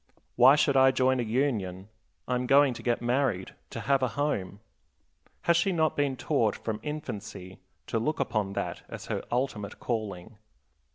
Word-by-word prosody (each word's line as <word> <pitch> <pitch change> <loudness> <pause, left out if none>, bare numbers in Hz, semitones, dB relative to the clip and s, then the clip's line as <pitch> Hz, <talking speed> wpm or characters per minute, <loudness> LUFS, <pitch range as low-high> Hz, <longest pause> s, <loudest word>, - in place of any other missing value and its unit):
"Why 130 +4 +7
should 150 -2 +2
I 135 0 +7
join 130 0 +2
a - - +2
union? 110 -6 -1 0.4
I 125 - -1
am 125 0 -1
going 140 0 +5
to - - -9
get 120 -1 -1
married, 120 -6 0 0.2
to - - -6
have 140 -1 +2
a 130 - +2
home." 105 -7 -2 0.8
Has 170 - +4
she 175 +3 +2
not 160 -3 +1
been 140 -2 0
taught 120 -9 +1
from 110 -2 -4
infancy 105 - -6 0.3
to 115 - -1
look 150 +7 -1
upon 110 -6 -1
that - - -3
as - - -8
her - - -3
ultimate 120 -5 -2
calling? 110 -3 -4
125 Hz, 170 wpm, -28 LUFS, 105-140 Hz, 0.8 s, Why